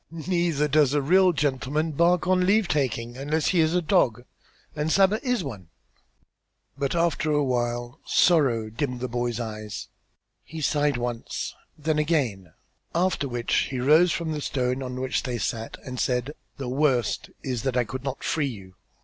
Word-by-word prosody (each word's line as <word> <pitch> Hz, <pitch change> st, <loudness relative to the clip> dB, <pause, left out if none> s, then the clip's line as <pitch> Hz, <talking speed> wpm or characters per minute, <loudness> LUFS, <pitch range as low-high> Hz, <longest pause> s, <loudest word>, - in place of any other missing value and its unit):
"Neither 165 Hz, -2 st, 0 dB
does 150 Hz, -1 st, +3 dB
a 145 Hz, -, +3 dB
real 185 Hz, +5 st, +5 dB
gentleman 150 Hz, +1 st, -1 dB
bark 170 Hz, +3 st, +3 dB
on 185 Hz, 0 st, +3 dB
leave 210 Hz, 0 st, +3 dB
taking 120 Hz, -5 st, -1 dB
unless 150 Hz, +3 st, 0 dB
he 180 Hz, -, +2 dB
is 160 Hz, +1 st, +3 dB
a 180 Hz, -, +2 dB
dog, 125 Hz, -, +2 dB, 0.5 s
and 155 Hz, +1 st, -1 dB
Saba 195 Hz, +4 st, +4 dB
is 250 Hz, -7 st, 0 dB
one." 105 Hz, -, -7 dB, 1.1 s
But 140 Hz, +2 st, -2 dB
after 170 Hz, -2 st, +1 dB
a 150 Hz, -1 st, +2 dB
while 120 Hz, -1 st, -2 dB
sorrow 125 Hz, -11 st, +3 dB
dimmed 125 Hz, +1 st, -3 dB
the 130 Hz, -, -2 dB
boy's 120 Hz, -1 st, -2 dB
eyes; 110 Hz, -2 st, -6 dB, 0.5 s
he 160 Hz, -, -8 dB
sighed 145 Hz, -2 st, +1 dB
once, 120 Hz, -1 st, -4 dB, 0.2 s
then 155 Hz, 0 st, 0 dB
again; 130 Hz, -, 0 dB, 0.4 s
after 175 Hz, -5 st, +1 dB
which 120 Hz, -2 st, 0 dB
he 130 Hz, -, -3 dB
rose 155 Hz, +7 st, +5 dB
from 165 Hz, -1 st, -2 dB
the 150 Hz, -1 st, -3 dB
stone 125 Hz, -1 st, -1 dB
on 125 Hz, -1 st, -5 dB
which 130 Hz, 0 st, -1 dB
they 125 Hz, -3 st, -3 dB
sat 115 Hz, +1 st, -3 dB
and 125 Hz, -2 st, -6 dB
said: 125 Hz, +3 st, 0 dB, 0.2 s
"The 135 Hz, -3 st, -5 dB
worst 130 Hz, -3 st, +1 dB
is 125 Hz, -4 st, -2 dB
that 130 Hz, 0 st, -1 dB
I 125 Hz, -, +3 dB
could 130 Hz, +4 st, -6 dB
not 135 Hz, -1 st, -4 dB
free 150 Hz, -3 st, 0 dB
you." 95 Hz, -7 st, -9 dB
140 Hz, 170 wpm, -25 LUFS, 120-160 Hz, 1.1 s, real